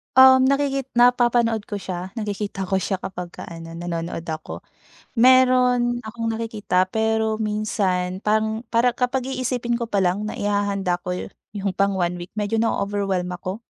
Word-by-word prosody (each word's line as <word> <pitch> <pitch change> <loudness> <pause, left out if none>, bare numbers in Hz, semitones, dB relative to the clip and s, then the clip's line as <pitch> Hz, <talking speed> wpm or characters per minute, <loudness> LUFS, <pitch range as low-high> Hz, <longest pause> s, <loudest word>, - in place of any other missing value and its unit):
Um, 260 0 +8
nakikit 275 -1 +1
napapanood 240 -2 +3
ko 205 - -4
siya 185 0 -6
nakikita 205 -3 -3
ko 190 +1 0
siya 190 - -1
kapag 180 -2 -6
ka - - -8
ano 165 0 -8
nanonood 170 -1 -4
ako. 160 -1 -6 0.5
Meron 250 -1 +4
akong 230 +1 -3
nakikita, 220 -5 0
pero 220 +2 0
minsan 195 -4 -1
parang 220 +1 +1
para 240 +1 +3
kapag 250 +1 -1
iisipin 255 -2 -2
ko 235 -1 -2
pa 205 - 0
lang 195 +3 +1
na - - -6
ihahanda 200 -3 0
ko 180 0 -3
yu - - -5 0.3
yung 195 -1 -2
pang 200 0 +1
1 175 -1 0
week 175 - -8
medyo 215 +2 0
na-o-overwhelm 200 -4 0
ako. 185 +5 -5
215 Hz, 155 wpm, -23 LUFS, 190-240 Hz, 0.5 s, Um